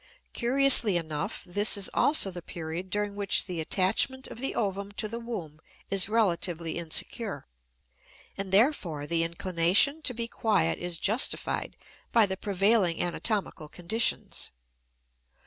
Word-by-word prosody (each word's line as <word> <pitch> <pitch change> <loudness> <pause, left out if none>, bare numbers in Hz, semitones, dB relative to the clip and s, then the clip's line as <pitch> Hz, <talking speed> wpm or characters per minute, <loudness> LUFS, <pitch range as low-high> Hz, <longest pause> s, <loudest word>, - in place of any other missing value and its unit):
Curiously 245 -5 +5
enough 155 -3 -4
this 205 +4 +3
is 200 - -1
also 285 -10 +2
the 175 -1 -8
period 170 +2 -6
during 205 +1 -2
which 200 -1 0
the 180 -3 -5
attachment 205 - 0
of - - -9
the 270 - -2
ovum 200 -2 -2
to 215 +1 -3
the 230 +2 -6
womb 180 -11 -7 0.3
is 195 0 +2
relatively 175 -6 0
insecure, 195 +6 -4 0.9
and 195 -1 -5
therefore 190 - +2
the 165 +2 0
inclination 180 - +2
to 250 -5 +1
be 230 0 -2
quiet 205 -8 0
is 175 -1 -3
justified 220 +9 0 0.3
by 230 -2 +5
the 190 -1 -3
prevailing 195 -2 +1
anatomical 180 -3 -2
conditions. 205 +9 -1
195 Hz, 130 wpm, -28 LUFS, 170-225 Hz, 0.9 s, Curiously